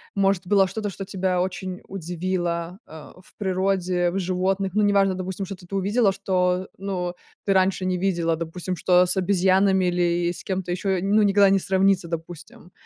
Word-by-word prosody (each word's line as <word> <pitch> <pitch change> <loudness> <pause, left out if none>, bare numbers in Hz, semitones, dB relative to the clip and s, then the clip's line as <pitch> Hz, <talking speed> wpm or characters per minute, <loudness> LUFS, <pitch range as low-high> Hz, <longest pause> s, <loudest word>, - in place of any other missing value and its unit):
может, 195 -2 +1
было 195 0 +4
что-то, 205 +2 -4
что 195 - -7
тебя 190 -2 -1
очень 185 0 -4
удивило, 175 -1 -3
а, 160 -1 -12
в - - -22
природе, 185 -2 0
в 185 - -3
животных? 190 +1 -1
Ну, 210 - +3
неважно, 200 -1 +3
допустим, 185 +1 -4
что-то 185 -2 -10
ты 195 - -6
увидела, 200 +2 +2
что, 185 -1 0
э, - - -15
ну, 180 -2 -3 0.3
ты 200 - +1
раньше 190 0 +2
не 185 0 0
видела, 170 -3 0
допустим, 175 +2 -4
что 180 +1 +4
с 180 +2 -1
обезьянами 190 0 +3
или 175 -1 +1
и - - -2
с - - -10
кем-то 190 -2 -3
ещё, 190 +1 -1
ну, 205 +3 +3
никогда 200 -1 +5
не 195 0 +3
сравнится, 190 -1 +2
допустим, 165 +1 -8
185 Hz, 180 wpm, -24 LUFS, 180-195 Hz, 0.3 s, никогда